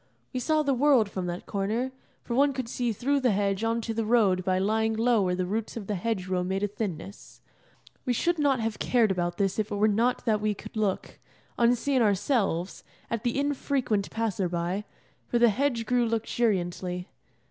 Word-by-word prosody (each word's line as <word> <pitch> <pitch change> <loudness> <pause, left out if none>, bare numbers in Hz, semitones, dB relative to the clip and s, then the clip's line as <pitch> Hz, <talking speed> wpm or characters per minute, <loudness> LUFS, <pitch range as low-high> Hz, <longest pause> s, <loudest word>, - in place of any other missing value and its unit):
We 255 - -1
saw 310 +4 +2
the 280 -2 +1
world 255 -6 +3
from 185 -2 -3
that 175 0 -5
corner, 215 +6 -1 0.3
for 240 - -4
one 280 +3 +3
could 260 -2 -4
see 240 0 -1
through 275 +7 0
the 250 -5 +2
hedge 200 +1 0
on 230 +1 +1
to 225 0 -3
the 225 0 -1
road 210 -5 +3
by 185 0 +1
lying 220 +3 +1
low 230 0 +3
where 180 -2 +1
the 185 0 -1
roots 215 +5 -3
of 215 - -5
the 210 - -2
hedge 195 0 -2
row 185 -1 -1
made 190 +2 -2
a - - +2
thinness. 200 -2 -6 0.6
We 250 - 0
should 340 +7 +1
not 280 -3 +3
have 225 -1 -2
cared 230 -5 +3
about 175 -2 -1
this 195 0 0
if 215 0 -1
it 205 - -3
were 210 +1 +3
not 230 +4 +1
that 215 -3 +2
we 210 -1 0
could 215 +3 -11
look, 210 -3 -2 0.4
unseen 245 +3 +2
ourselves, 200 - 0 0.3
at 230 -2 -1
the 240 +3 0
infrequent 270 -7 0
passer 205 -5 -1
by, 175 +4 -2 0.4
for 240 - +1
the 235 0 +6
hedge 235 0 0
grew 240 0 +2
luxuriantly. 185 -5 -1
220 Hz, 200 wpm, -27 LUFS, 195-245 Hz, 0.6 s, the